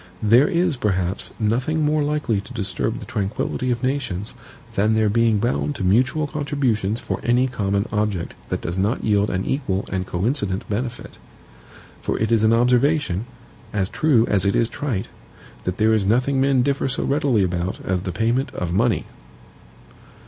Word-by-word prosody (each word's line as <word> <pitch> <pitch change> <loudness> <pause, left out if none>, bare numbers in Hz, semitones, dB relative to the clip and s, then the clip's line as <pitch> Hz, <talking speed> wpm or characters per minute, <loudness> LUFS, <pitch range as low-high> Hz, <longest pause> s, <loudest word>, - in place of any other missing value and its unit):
There 115 +6 +5
is, 175 -5 +1
perhaps, 95 -4 0
nothing 125 +8 +1
more 150 +1 +2
likely 145 -8 0
to 125 - -11
disturb 105 -5 -2
the - - -8
tranquillity 105 +5 -2
of 120 -1 -1
nations 125 -8 -2 0.4
than 105 +3 +2
their 110 -1 +3
being 115 0 +3
bound 125 +6 -1
to 100 - -4
mutual 130 +11 +2
contributions 135 -8 -1
for - - -4
any 125 +2 +2
common 100 -4 -1
object 105 -5 -1 0.2
that - - -2
does 85 +3 -3
not 105 +7 0
yield 105 -1 +2
an 90 +1 -2
equal 105 -8 -1
and 95 -1 -2
coincident 100 +1 -1
benefit. 120 +3 -4 0.8
For - - -1
it 110 +1 -1
is 115 -2 +3
an 110 - +5
observation, 125 - +2 0.5
as 100 -2 0
true 130 -8 +3
as 100 -5 +1
it 100 - +1
is 115 - +2
trite, 115 -8 -3 0.6
that 90 0 -2
there 110 +1 +3
is 110 -2 +2
nothing 130 +5 +2
men 135 -2 +3
differ 140 +1 0
so 130 - -1
readily 140 -7 +2
about 90 0 -2
as 90 -1 0
the 90 - -4
payment 115 +8 0
of 85 -1 -3
money. 115 +5 +1
115 Hz, 170 wpm, -22 LUFS, 100-130 Hz, 0.8 s, There